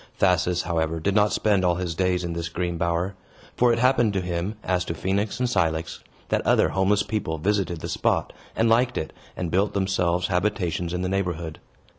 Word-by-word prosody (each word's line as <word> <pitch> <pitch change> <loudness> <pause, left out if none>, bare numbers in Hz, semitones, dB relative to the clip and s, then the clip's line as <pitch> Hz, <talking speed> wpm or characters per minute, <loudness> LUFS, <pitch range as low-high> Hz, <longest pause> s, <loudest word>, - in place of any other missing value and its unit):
Thasus, 90 -1 +2
however, 80 -2 -1
did 95 +5 0
not 105 0 +3
spend 100 -3 +2
all 90 -1 +3
his 90 -1 -3
days 90 +1 0
in 85 -1 -3
this 85 0 -3
green 85 0 -2
bower. 85 +3 -1 0.4
For 125 -1 +4
it 115 - +2
happened 120 -3 +3
to 95 - 0
him, 90 +3 -3
as 90 -1 0
to 85 - -3
Phoenix 100 +6 -1
and 125 - +1
Cilix, 80 -7 0 0.3
that - - +1
other - - +3
homeless 100 +2 +2
people 105 -6 -2
visited 95 -1 -1
the - - -4
spot, - - 0 0.2
and 115 - +2
liked 120 +3 +3
it, 80 - -4 0.2
and 90 -3 -3
built 100 +4 +1
themselves 90 -2 +1
habitations 90 -3 -1
in 90 +1 -2
the 90 - -1
neighborhood. 85 -4 -2
90 Hz, 195 wpm, -25 LUFS, 85-100 Hz, 0.4 s, For